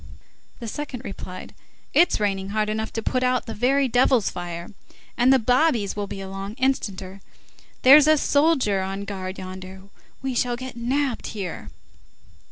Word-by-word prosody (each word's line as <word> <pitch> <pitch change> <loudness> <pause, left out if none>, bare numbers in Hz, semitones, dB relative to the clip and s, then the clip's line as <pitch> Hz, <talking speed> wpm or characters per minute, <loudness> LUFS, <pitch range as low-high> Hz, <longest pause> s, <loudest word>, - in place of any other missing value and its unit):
The 235 - -6
second 265 0 -5
replied: 185 -2 -8 0.4
"It's 350 - +4
raining 195 -2 -1
hard 215 +1 0
enough 220 +1 -2
to 225 - -3
put 255 - 0
out 255 0 +1
the 225 - -5
very 265 +5 +2
devil's 245 -2 +3
fire. 175 -1 -6 0.5
And 250 +2 +4
the 265 - +7
bobbies 245 -3 +2
will 205 -1 -3
be 195 - -7
along 195 +2 -6
instanter. 200 -8 -2 0.6
There's 280 +3 +9
a 310 0 +6
soldier 285 -10 +2
on 195 +1 -4
guard 190 -2 -5
yonder. 185 0 -8 0.4
We 265 -1 -1
shall 245 0 0
get 255 0 -7
nabbed 255 +2 -1
here." 185 -4 -5
220 Hz, 155 wpm, -24 LUFS, 195-260 Hz, 0.6 s, There's